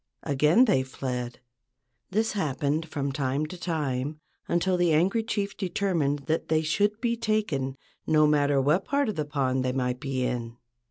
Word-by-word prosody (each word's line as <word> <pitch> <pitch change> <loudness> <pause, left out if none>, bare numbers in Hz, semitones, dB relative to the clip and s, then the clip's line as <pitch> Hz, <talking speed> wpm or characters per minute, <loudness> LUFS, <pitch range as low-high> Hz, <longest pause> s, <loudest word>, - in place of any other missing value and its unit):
Again 150 - +4
they 200 - +3
fled. 125 -2 -5 0.7
This 220 +3 +1
happened 155 -3 -1
from 140 -3 -2
time 135 +1 -1
to 155 - -8
time 150 -5 -2 0.3
until 180 +2 +1
the 175 -2 +2
angry 185 +9 +3
chief 205 -3 -2
determined 175 -7 0
that 160 +1 -1
they 155 0 +2
should 205 +7 +1
be 235 -1 +1
taken, 170 - -1 0.3
no 155 -1 +5
matter 145 -2 +3
what 150 +8 +2
part 280 -3 +1
of 210 - -3
the 150 - -1
pond 130 -3 0
they 130 0 0
might 125 -1 -1
be 135 -2 -2
in. 120 -1 -3
150 Hz, 165 wpm, -27 LUFS, 135-185 Hz, 0.7 s, no